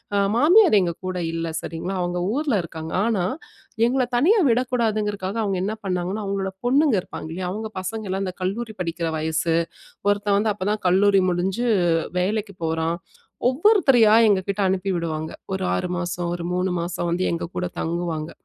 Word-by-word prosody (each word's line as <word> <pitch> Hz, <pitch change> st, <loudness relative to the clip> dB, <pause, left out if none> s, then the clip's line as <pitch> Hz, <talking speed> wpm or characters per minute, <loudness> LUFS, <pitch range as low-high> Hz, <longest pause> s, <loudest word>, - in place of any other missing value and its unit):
ஆ -, -, +3 dB, 0.2 s
மாமியார் 340 Hz, -, +6 dB
எங்ககூட 185 Hz, +1 st, -3 dB, 0.2 s
இல்ல. 165 Hz, 0 st, -2 dB
சரிங்களா! 175 Hz, +4 st, -4 dB
அவுங்க 175 Hz, 0 st, -1 dB
ஊருல 285 Hz, -2 st, 0 dB
இருக்காங்க. 160 Hz, -1 st, -7 dB
ஆனா, 210 Hz, -6 st, +1 dB, 0.6 s
எங்கள 255 Hz, +1 st, +1 dB
தனியா 375 Hz, -, +4 dB
விடக்கூடாதுங்குறதுக்காக, 215 Hz, -5 st, 0 dB
அவுங்க 195 Hz, -2 st, -1 dB
என்ன 210 Hz, +3 st, -2 dB
பண்ணாங்கன்னா, 185 Hz, +3 st, -2 dB
அவுங்களோட 195 Hz, -1 st, -2 dB, 0.2 s
பொண்ணுங்க 275 Hz, -2 st, +4 dB
இருப்பாங்க 160 Hz, -, -8 dB
இல்லயா! 180 Hz, +1 st, -3 dB
அவுங்க 220 Hz, +3 st, -4 dB
பசங்கள்லாம் 195 Hz, -1 st, -3 dB
இந்த 185 Hz, -1 st, -5 dB
கல்லூரி 220 Hz, +4 st, -3 dB
படிக்கிற 165 Hz, -1 st, -2 dB
வயசு 160 Hz, +1 st, 0 dB, 0.5 s
ஒருத்தன், 205 Hz, 0 st, +2 dB
வந்து 215 Hz, +1 st, +1 dB
அப்ப 195 Hz, -1 st, -3 dB
தான் 210 Hz, -, -3 dB
கல்லூரி 195 Hz, +1 st, +4 dB
முடிஞ்சு 190 Hz, +7 st, -1 dB, 0.5 s
வேலைக்கு 205 Hz, +2 st, -1 dB
போறான், 160 Hz, +1 st, 0 dB, 0.5 s
ஒவ்வொருத்தரையா 270 Hz, -, +5 dB, 0.2 s
எங்ககிட்டே 200 Hz, +1 st, 0 dB
அனுப்பி 190 Hz, +1 st, -1 dB
விடுவாங்க. 160 Hz, -2 st, -3 dB, 0.2 s
ஒரு 190 Hz, -, -3 dB
6 180 Hz, -, -1 dB
மாசம், 175 Hz, 0 st, -3 dB
ஒரு 175 Hz, -, -5 dB
3 180 Hz, +1 st, 0 dB
மாசம் 175 Hz, 0 st, -3 dB
வந்து 180 Hz, +2 st, 0 dB
எங்ககூட 175 Hz, +2 st, -3 dB
தங்குவாங்க. 165 Hz, -2 st, -2 dB
190 Hz, 150 wpm, -23 LUFS, 175-220 Hz, 0.6 s, மாமியார்